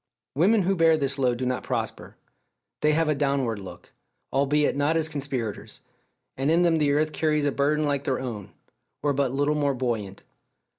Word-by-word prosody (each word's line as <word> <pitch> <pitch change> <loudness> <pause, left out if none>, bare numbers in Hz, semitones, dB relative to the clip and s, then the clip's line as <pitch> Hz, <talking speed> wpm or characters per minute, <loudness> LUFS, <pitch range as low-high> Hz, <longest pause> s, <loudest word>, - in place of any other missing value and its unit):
Women 195 - +3
who 195 +2 +1
bear 165 -2 +4
this 140 -1 -1
load 125 -2 +2
do 130 - -3
not 125 0 -1
prosper. - - -4 0.6
They 150 0 +2
have 165 +1 +2
a 155 - +3
downward 140 -6 0
look, 95 - -11 0.4
albeit 140 +2 +2
not 145 +3 +1
as 160 -1 +1
conspirators; 135 -8 -4 0.5
and 135 +2 -1
in 170 +2 +4
them 170 -2 +3
the 145 -2 +2
earth 155 +1 +1
carries 150 -2 +1
a 145 - +2
burden 150 +3 +1
like 140 -1 -1
their 130 - 0
own, 115 -7 -6 0.5
or 145 -1 +2
but 135 -2 0
little 145 +2 +1
more 145 -2 0
buoyant. 115 -6 -3
145 Hz, 185 wpm, -25 LUFS, 130-155 Hz, 0.6 s, bear